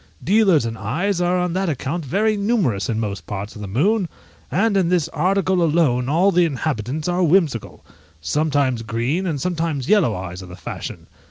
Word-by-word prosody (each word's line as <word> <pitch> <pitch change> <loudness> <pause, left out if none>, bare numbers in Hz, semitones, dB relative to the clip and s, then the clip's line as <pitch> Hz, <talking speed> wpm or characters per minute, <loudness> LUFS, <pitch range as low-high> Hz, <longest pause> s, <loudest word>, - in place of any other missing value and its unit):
Dealers 195 - +4
in 115 0 -3
eyes 170 - -1
are 175 +1 +2
on 180 -1 -1
that 190 0 0
account 150 +3 -3
very 210 +10 +1
numerous 200 - 0
in 110 -1 0
most 105 -3 -4
parts 100 +1 -5
of 105 - -9
the 100 - -5
moon, 180 - +1 0.4
and 200 +8 +1
in 185 -3 +2
this 175 -4 +2
article 185 +2 +1
alone 150 -7 +2
all 175 +7 +3
the 180 -1 +4
inhabitants 150 -2 -2
are 175 +1 0
whimsical: 165 - +1 0.3
sometimes 140 - 0
green 120 - -1
and 155 -5 -2
sometimes 165 -4 -2
yellow 200 - +4
eyes 90 0 -6
are 95 - -10
the 90 - -10
fashion. - - -7
160 Hz, 180 wpm, -21 LUFS, 120-185 Hz, 0.4 s, Dealers